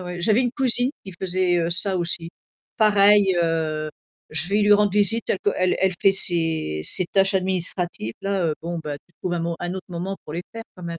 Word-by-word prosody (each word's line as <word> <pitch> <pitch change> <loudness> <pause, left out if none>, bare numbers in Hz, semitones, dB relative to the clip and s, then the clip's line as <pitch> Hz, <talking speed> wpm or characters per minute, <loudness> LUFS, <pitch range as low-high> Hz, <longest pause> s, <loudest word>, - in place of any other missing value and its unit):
ouais. 180 -1 -6
J'avais 215 +6 +3
une 245 -2 -1
cousine 255 -2 +1
qui 190 - -9
faisait, 185 -1 +1
heu, 170 0 0
ça 190 +2 0
aussi. 170 -1 -2 0.5
Pareil, 205 -2 +5
heu, 155 -2 -1 0.4
je 155 +2 0
vais 205 +1 +1
lui 205 0 +5
rendre 205 -1 +3
visite 210 +2 +1
telle - - 0
qu'elle 185 -2 +1
elle 190 -1 +2
fait 195 - +5
ses 165 - 0
ses 185 - +3
tâches 195 0 +3
administratives 180 - -1
là, 195 -2 -1
heu, 155 - 0
bon 170 +1 -4
bah 150 -1 -3
tu 175 - -34
trouves 180 - -3
un 170 - -2
mo 170 0 -2
un 175 +1 -4
autre 190 - -7
moment 180 +3 -4
pour - - -8
les 175 - -3
faire 230 - -7
quand 180 - -10
même, 170 -1 -5
185 Hz, 220 wpm, -23 LUFS, 170-200 Hz, 0.5 s, Pareil